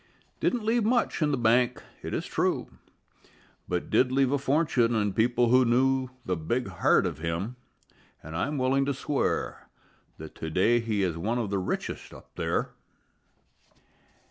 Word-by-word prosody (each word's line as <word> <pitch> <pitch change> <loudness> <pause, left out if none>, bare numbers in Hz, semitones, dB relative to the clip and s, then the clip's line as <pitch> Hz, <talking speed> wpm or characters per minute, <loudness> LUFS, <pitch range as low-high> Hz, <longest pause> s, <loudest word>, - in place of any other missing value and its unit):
Didn't 245 -3 0
leave 230 +1 +2
much 235 -2 +1
in 150 - +3
the 140 - 0
bank, 120 +1 +2 0.2
it - - -6
is - - -2
true, - - -1 1.0
But 90 -1 -3
did 125 0 +3
leave 135 0 +2
a 145 - +1
fortune 135 -5 +2
in 105 -3 0
people 120 +2 +2
who 130 +2 +6
knew 130 +2 +2 0.2
The 90 - 0
big 110 +9 -2
heart 95 - +3
of - - -3
him, 85 +9 -3 0.7
an' 80 - -9
I'm 140 - -1
willing 135 +1 +2
to 140 - 0
swear 140 +1 -2 0.5
That 80 0 -9
to 80 - -6
day 110 +9 +3
he 110 -3 -1
is 85 -3 -1
one 110 +8 -1
of 110 -5 -2
the 100 - 0
richest 95 - -4
up - - -15
there. - - -1
120 Hz, 165 wpm, -27 LUFS, 100-135 Hz, 1.0 s, who